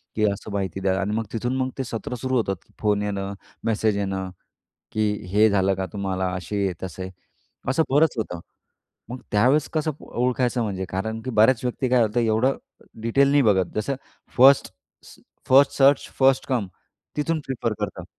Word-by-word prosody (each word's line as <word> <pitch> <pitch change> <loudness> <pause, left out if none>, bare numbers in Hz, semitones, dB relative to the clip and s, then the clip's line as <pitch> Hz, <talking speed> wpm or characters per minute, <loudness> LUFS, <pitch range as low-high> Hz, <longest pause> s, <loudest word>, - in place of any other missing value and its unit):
की 110 - 0
असं 100 +2 -7
माहिती 95 -2 -2
द्या 95 0 +1
अन् 100 +2 -1
मग 115 0 -1
तिथून 120 +3 -1
मग 130 0 0
ते 135 - -1
सत्र 115 +1 -5
सुरू 130 0 -1
होतात 100 -4 0
की - - -28
फोन 105 -1 +1
येणं, 100 -1 -3 0.3
मेसेज 110 -2 +1
येणं 95 -2 -2 0.6
की 110 -1 +1 0.2
हे 110 +2 +5
झालं 95 -1 +2
का 95 0 -3
तुम्हाला? 95 -2 -2
असेही-तसेही 95 -1 -4 0.6
असं 140 +5 +3
बरंच 150 +3 +4
होतं. 90 -6 -3 0.7
मग 125 - -6
त्यावेळेस 130 +8 +3
कसं 155 0 0
ओळखायचं? 125 0 0
म्हणजे 95 -3 -3
कारण 110 +5 -3
की 130 - -4
बऱ्याच 115 +2 +4
व्यक्ती 125 +1 -1
काय 125 -1 +5
होतं? 110 +2 +1
एवढं 115 +4 +2 0.5
डिटेल 135 +5 +3
नाही 145 0 +4
बघत. 95 -6 +2
जसं 120 +6 -1 0.4
फर्स्ट 135 +2 +6 0.3
स - - -15 0.3
फर्स्ट 135 +2 +6
सर्च, 140 0 +4
फर्स्ट 135 0 +4
कम 120 -6 0 0.5
तिथून 155 +2 0
प्रिफर 120 -4 -2
करतात. - - -4
110 Hz, 170 wpm, -24 LUFS, 100-130 Hz, 0.7 s, फर्स्ट